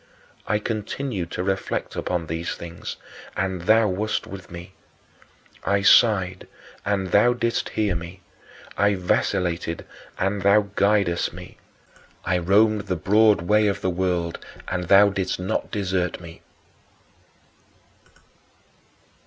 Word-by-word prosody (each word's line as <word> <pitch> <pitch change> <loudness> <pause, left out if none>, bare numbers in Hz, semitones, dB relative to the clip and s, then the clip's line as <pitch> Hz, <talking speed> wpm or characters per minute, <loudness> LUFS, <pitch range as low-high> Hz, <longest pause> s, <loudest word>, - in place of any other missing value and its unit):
I 105 - +2
continued 110 -2 -4
to 90 - -2
reflect 95 0 -2
upon 90 -2 -2
these 80 +1 -4
things, 85 0 -7 0.4
and 95 -2 -2
thou 110 +4 +4
wast 105 +3 -2
with 95 -1 -10
me. 85 +1 -9 0.9
I 100 0 +1
sighed, 95 -4 +4 0.4
and 95 -3 -1
thou 120 +4 +5
didst 115 -1 -1
hear 105 -3 +2
me. 85 +2 -7 0.5
I 100 0 +2
vacillated, 90 -2 -1 0.3
and 100 +1 -1
thou 100 +1 +3
guidedst 100 -4 +2
me. - - -11 0.7
I 90 - +1
roamed 105 +3 +3
the 90 - 0
broad 105 +2 +3
way 105 +3 +3
of 100 - -1
the 95 - 0
world, 90 -2 -2 0.3
and 90 -1 -2
thou 100 +3 +6
didst 95 -2 -2
not 90 +1 -2
desert 95 -4 -2
me. 85 -1 -12
95 Hz, 120 wpm, -23 LUFS, 90-105 Hz, 0.9 s, thou